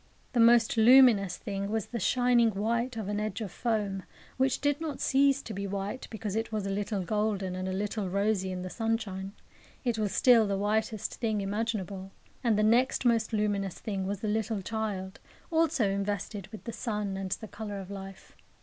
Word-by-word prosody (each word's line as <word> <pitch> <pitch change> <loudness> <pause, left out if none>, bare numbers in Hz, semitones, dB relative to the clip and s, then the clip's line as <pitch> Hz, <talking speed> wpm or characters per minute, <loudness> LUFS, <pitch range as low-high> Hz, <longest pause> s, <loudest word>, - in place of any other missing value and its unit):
The 245 - +1
most 230 0 +5
luminous 225 -6 +6
thing 200 0 -4
was 220 -1 -1
the 235 - -5
shining 245 +2 +3
white 235 +4 -1
of 215 -3 -4
an 205 0 -1
edge 210 -2 -3
of 210 -5 -5
foam, 210 -4 -1 0.4
which 265 0 +2
did 290 +1 0
not 310 -4 -4
cease 275 0 +3
to 220 - -6
be 200 +1 -3
white 200 +5 -4
because 215 -2 -4
it 225 +1 -2
was 215 -2 -2
a 195 - -2
little 200 0 -2
golden 205 -2 -1
and 185 0 -3
a - - -2
little 200 +1 -2
rosy 200 0 0
in 180 0 -4
the 185 - -5
sunshine. 215 -4 -2 0.5
It 235 -4 0
was 210 -2 0
still 230 0 +5
the 200 -1 0
whitest 215 +1 -1
thing 220 -3 0
imaginable. 200 -2 -3 0.3
And 230 -4 +3
the 215 - +3
next 245 +4 +3
most 230 -2 +2
luminous 205 -3 -1
thing 195 -3 -3
was 200 0 -3
the 215 - -2
little 215 -1 -1
child, 200 -3 -3 0.3
also 320 -8 +2
invested 200 0 -3
with 215 +2 -10
the 230 - -6
sun 210 -4 -3
and 190 0 -4
the 220 - -6
colour 205 -1 -6
of 195 0 -8
life. 195 -1 -9
210 Hz, 195 wpm, -29 LUFS, 195-230 Hz, 0.5 s, luminous